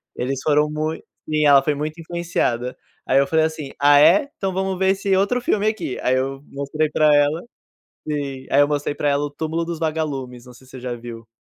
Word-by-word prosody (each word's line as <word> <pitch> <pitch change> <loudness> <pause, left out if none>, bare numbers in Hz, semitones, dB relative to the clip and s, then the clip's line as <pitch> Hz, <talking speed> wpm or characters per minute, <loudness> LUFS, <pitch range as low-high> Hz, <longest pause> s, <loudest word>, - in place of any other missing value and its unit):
eles 130 +2 -2
foram 150 0 +3
mui". 155 +1 -3 0.3
Sim, 155 0 +1
ela 140 -2 +6
foi 150 - +1
muito 155 +3 -5
influenciada. 160 -8 -2 0.3
Aí 130 - +3
eu 140 - +4
falei 160 +2 +2
assim: 155 -3 -5
"Ah 145 0 +6
é? 280 - +5
Então 190 -1 -3
vamos 190 0 -1
ver 190 +1 +2
esse 195 0 +1
outro 200 +6 +1
filme 215 -3 0
aqui". 215 - -2
Aí 130 - +2
eu 135 +1 -3
mostrei 140 +3 -2
pra 150 0 +4
ela 145 +3 +2 0.7
sim, 140 -3 -4
aí 140 - +4
eu 145 - +4
mostrei 145 0 -1
pra 145 - -1
ela 140 0 +1
o 145 - -4
Túmulo 160 +3 -3
dos 170 -1 -5
Vagalumes, 145 -6 -3
não 125 - -12
sei 130 - -18
se - - -19
você 130 - -9
já 125 -1 -4
viu, 115 -1 -9
150 Hz, 220 wpm, -21 LUFS, 135-160 Hz, 0.7 s, ela